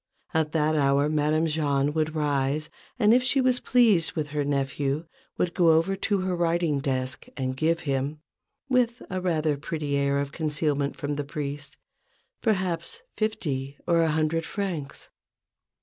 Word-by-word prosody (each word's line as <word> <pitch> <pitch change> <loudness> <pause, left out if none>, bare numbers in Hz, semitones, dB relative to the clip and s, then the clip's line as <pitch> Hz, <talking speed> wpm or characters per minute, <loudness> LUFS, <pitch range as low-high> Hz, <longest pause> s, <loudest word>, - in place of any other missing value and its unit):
At 160 -1 +1
that 155 -1 +2
hour 140 0 +3
Madame 155 +1 +2
Jahn 145 -2 +1
would 155 0 -1
rise, 145 0 0 0.3
and, 220 -2 +5
if 250 - +5
she 255 +2 +2
was 255 -1 +3
pleased 220 -10 +3
with 150 -2 -3
her 145 0 -1
nephew, 140 +2 -1 0.3
would 175 -1 0
go 170 -2 +4
over 165 +5 +2
to 200 0 0
her 185 -1 -1
writing 170 -3 +1
desk 130 -2 -2
and 130 -1 -2
give 165 +4 +1
him, 140 +1 -2 0.5
with 250 -2 +1
a 185 0 -2
rather 160 -4 +1
pretty 150 0 -3
air 140 0 +2
of 140 0 -2
concealment 145 -2 -1
from 145 0 -3
the 145 - -1
priest, 145 0 -5 0.6
perhaps 195 - -1
fifty 145 -11 -2
or 170 -1 +3
a 165 - +3
hundred 155 +1 +1
francs. 175 -8 -4
155 Hz, 155 wpm, -26 LUFS, 140-175 Hz, 0.6 s, and